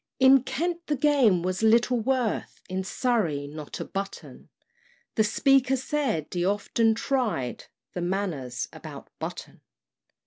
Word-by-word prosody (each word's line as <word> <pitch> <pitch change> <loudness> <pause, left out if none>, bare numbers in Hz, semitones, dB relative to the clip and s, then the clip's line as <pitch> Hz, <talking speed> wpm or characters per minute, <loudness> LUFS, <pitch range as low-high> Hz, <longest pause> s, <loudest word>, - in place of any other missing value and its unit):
In 265 0 +7
Kent 335 +7 -3
the 295 - +1
game 260 - +3
was 185 +2 -1
little 235 +2 +4
worth, 245 -1 -1
In 190 0 -2
Surrey 190 - 0
not 150 +1 -8
a - - -4
button; 195 0 -7 0.6
The 220 - +3
Speaker 270 +4 +3
said 265 - -1
he 175 -1 -1
often 205 +3 +2
tried 225 - -1 0.3
The 180 - -3
Manors 175 -9 -2
about - - -10
Button. - - -7
220 Hz, 130 wpm, -26 LUFS, 185-265 Hz, 0.6 s, In